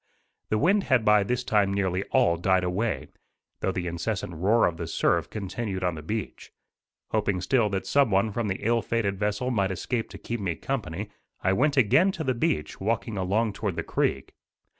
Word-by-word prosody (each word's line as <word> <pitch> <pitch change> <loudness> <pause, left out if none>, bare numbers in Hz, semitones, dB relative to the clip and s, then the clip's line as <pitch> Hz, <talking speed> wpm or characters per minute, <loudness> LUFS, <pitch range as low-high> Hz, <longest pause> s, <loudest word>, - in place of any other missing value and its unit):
The 110 - +2
wind 190 - +3
had 130 -5 +2
by 105 -1 +6
this 125 +5 -1
time 105 -5 +2
nearly 95 -2 0
all 85 - +3
died 95 +2 +2
away, 100 +5 -1 0.5
though 95 - 0
the 90 -1 -3
incessant 85 +2 -3
roar 100 +8 +3
of 85 - -1
the 85 - -4
surf 85 +2 +1
continued 100 -1 -4
on 90 -1 +1
the 80 - -7
beach. 105 +7 -5 0.6
Hoping 100 -4 +1
still 110 +4 +2
that 95 -1 -2
some 140 -4 +3
one 100 +2 +2
from 115 +1 -2
the 95 +1 -3
ill 115 0 +3
fated 100 -5 -1
vessel 105 +5 -1
might 100 -5 +1
escape 115 +5 -2
to - - -9
keep 120 0 -4
me 90 -5 -2
company, 110 - -4 0.3
I 95 - +3
went 140 +7 +2
again 150 - +5
to 170 - -4
the 130 -3 +1
beach, 95 -10 -1
walking 115 +2 -1
along 100 +3 0
toward 100 -3 -3
the - - -2
creek. 65 - -1
105 Hz, 195 wpm, -26 LUFS, 95-115 Hz, 0.6 s, by